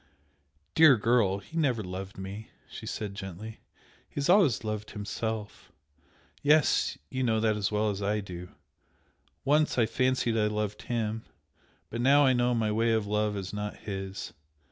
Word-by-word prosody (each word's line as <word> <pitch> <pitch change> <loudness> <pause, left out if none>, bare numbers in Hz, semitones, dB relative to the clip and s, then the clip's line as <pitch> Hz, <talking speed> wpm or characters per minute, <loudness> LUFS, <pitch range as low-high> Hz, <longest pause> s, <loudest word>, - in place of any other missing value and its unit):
"Dear 155 -6 +7
girl, 110 -3 +2
he 130 +11 -13
never 130 -9 +1
loved 95 +1 -6
me!" 100 +3 -7 0.2
she - - -9
said, 105 -2 -4
gently 100 +3 -8 0.5
"He - - -31
has 145 +2 -1
always 175 - +5
loved 105 -1 -4
himself. 105 +1 -5 0.7
Yes! 150 0 +3
you 130 - -2
know 115 -3 +2
that 110 -1 +2
as 105 -1 -1
well 105 0 +1
as 100 0 -5
I 105 +1 0
do! 90 -3 -7 1.0
Once 150 +1 +3
I 120 - +4
fancied 130 0 +1
I 105 - +3
loved 105 -1 -2
HIM 115 -2 -2 0.7
but 115 - -3
now 140 +3 +6
I 130 - +5
know 120 0 +2
my 110 -2 +1
way 115 +2 +2
of 110 -2 +1
love 105 0 0
is 95 0 -5
not 105 0 -4
his. 95 -1 -6
110 Hz, 165 wpm, -29 LUFS, 105-120 Hz, 1.0 s, Dear